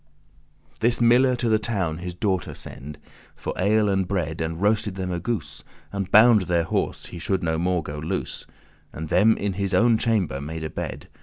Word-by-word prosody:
This 120 Hz, +2 st, +2 dB
miller 125 Hz, +2 st, +5 dB
to 120 Hz, -1 st, -1 dB
the 110 Hz, -1 st, +3 dB
town 95 Hz, -8 st, -2 dB
his 90 Hz, 0 st, -6 dB
daughter 95 Hz, 0 st, -1 dB
send 75 Hz, +3 st, -10 dB, 0.4 s
For -, -, -5 dB
ale 105 Hz, +3 st, +2 dB
and 95 Hz, -2 st, +1 dB
bread, 85 Hz, -5 st, -2 dB
and 80 Hz, +1 st, -3 dB
roasted 105 Hz, 0 st, +1 dB
them 95 Hz, -1 st, -3 dB
a 90 Hz, -, -2 dB
goose, 85 Hz, -7 st, -4 dB, 0.3 s
And 100 Hz, -1 st, -3 dB
bound 110 Hz, -2 st, +6 dB
their 85 Hz, -2 st, +2 dB
horse, 80 Hz, -, -2 dB
he 85 Hz, -, -8 dB
should 95 Hz, +2 st, -1 dB
no 80 Hz, -1 st, 0 dB
more 90 Hz, -1 st, 0 dB
go 75 Hz, 0 st, -6 dB
loose: 75 Hz, -, -4 dB, 0.4 s
And 80 Hz, 0 st, -7 dB
them 110 Hz, +1 st, +4 dB
in 100 Hz, -1 st, -2 dB
his 100 Hz, 0 st, -1 dB
own 115 Hz, -1 st, +4 dB
chamber 100 Hz, -, 0 dB
made 80 Hz, +2 st, -5 dB
a 80 Hz, -, -4 dB
bed. -, -, -6 dB
95 Hz, 190 wpm, -24 LUFS, 80-110 Hz, 0.4 s, bound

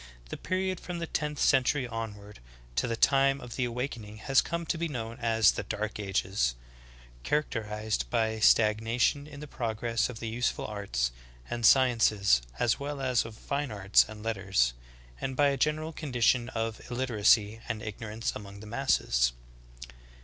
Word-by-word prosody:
The -, -, -4 dB
period 185 Hz, 0 st, -2 dB
from 180 Hz, -1 st, -6 dB
the 170 Hz, -, -3 dB
tenth 150 Hz, -2 st, -3 dB
century 135 Hz, -1 st, +3 dB
onward 105 Hz, -3 st, -7 dB, 0.4 s
to 65 Hz, -, +1 dB
the 115 Hz, -, -1 dB
time 135 Hz, +3 st, +3 dB
of 125 Hz, -3 st, -9 dB
the 130 Hz, -, 0 dB
awakening 120 Hz, -3 st, -5 dB
has 135 Hz, +5 st, +3 dB
come 170 Hz, 0 st, -4 dB
to 165 Hz, -, -1 dB
be 170 Hz, -, 0 dB
known 115 Hz, -4 st, -5 dB
as 115 Hz, -3 st, +4 dB
the -, -, -4 dB
dark 105 Hz, 0 st, -4 dB
ages 95 Hz, -10 st, 0 dB, 0.3 s
— -, -, -23 dB
characterized 110 Hz, -, -1 dB
by 110 Hz, -2 st, 0 dB
stag 110 Hz, 0 st, +4 dB
nation 120 Hz, +5 st, +1 dB
in 145 Hz, -1 st, -10 dB
the 150 Hz, -, -7 dB
progress 115 Hz, -1 st, -1 dB
of 115 Hz, -3 st, -7 dB
the 115 Hz, -, -4 dB
useful 120 Hz, +2 st, -1 dB
arts 95 Hz, -, -2 dB, 0.4 s
and 120 Hz, -1 st, +3 dB
sciences 110 Hz, -, +4 dB, 0.2 s
as 115 Hz, -, +1 dB
well 145 Hz, 0 st, -4 dB
as 130 Hz, -3 st, +1 dB
of 115 Hz, -1 st, -9 dB
fine 140 Hz, 0 st, -3 dB
arts 100 Hz, -2 st, +4 dB
and 105 Hz, -1 st, -9 dB
letters, 95 Hz, -, +1 dB, 0.5 s
and 130 Hz, -, -3 dB
by 145 Hz, +1 st, +4 dB
a 140 Hz, -, 0 dB
general 155 Hz, +4 st, 0 dB
condition 125 Hz, -4 st, +1 dB
of 115 Hz, -2 st, -3 dB
illiteracy 115 Hz, -3 st, +2 dB
and 110 Hz, -, -3 dB
ignorance 110 Hz, +1 st, -4 dB
among 100 Hz, -1 st, -9 dB
the 110 Hz, -, -10 dB
masses. 105 Hz, -, +1 dB
115 Hz, 165 wpm, -29 LUFS, 105-135 Hz, 0.5 s, as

